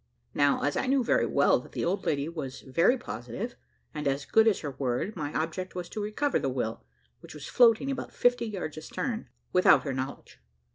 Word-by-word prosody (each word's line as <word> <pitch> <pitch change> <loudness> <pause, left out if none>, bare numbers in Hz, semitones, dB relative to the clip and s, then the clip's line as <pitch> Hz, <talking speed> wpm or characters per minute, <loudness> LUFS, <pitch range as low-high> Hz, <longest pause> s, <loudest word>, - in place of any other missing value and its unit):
Now, 145 0 +2
as 145 - +1
I - - 0
knew 265 -1 +3
very - - +2
well - - +3
that - - -14
the - - -2
old 185 +4 -1
lady 145 0 0
was 150 -6 -6
very 170 - +3
positive, 190 - -6 0.4
and 150 -1 -3
as 140 +1 -1
good 220 0 +4
as 215 - +3
her 145 - -4
word, 130 - -2
my 150 -4 -3
object 175 +4 -3
was 180 -1 -4
to 215 - -4
recover 215 +8 0
the 135 - -1
will, 120 -3 -3 0.4
which - - -12
was 145 -2 -8
floating 245 +2 +4
about 270 - -5
fifty 245 -1 +2
yards 180 -7 -5
astern, 230 +8 -4 0.2
without 180 - +6
her 140 - -2
knowledge. 130 +1 -6
165 Hz, 200 wpm, -28 LUFS, 140-225 Hz, 0.4 s, without